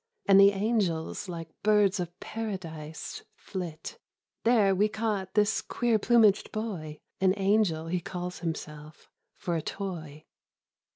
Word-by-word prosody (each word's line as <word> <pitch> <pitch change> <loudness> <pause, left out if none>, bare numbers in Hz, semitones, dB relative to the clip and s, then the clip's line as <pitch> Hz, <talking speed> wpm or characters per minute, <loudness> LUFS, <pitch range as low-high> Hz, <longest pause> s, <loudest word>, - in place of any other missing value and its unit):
And 195 0 +7
the 200 0 +9
angels 195 -4 -1
like 165 -2 -6
birds 210 -2 +3
of 175 0 -5
paradise 170 -8 -6
Flit; 180 - -7 0.4
there 220 -4 +4
we 200 +3 +3
caught 210 -4 -2
this 210 0 +3
quecr 235 -3 0
plumaged 220 -3 +4
boy 180 -9 -4 0.2
(An 190 0 +3
angel, 195 -5 +2
he 175 +2 -1
calls 180 0 -5
himself) 155 -2 -7 0.2
for 175 - -3
a 160 - 0
toy." 160 -6 -6
190 Hz, 125 wpm, -28 LUFS, 165-210 Hz, 0.4 s, the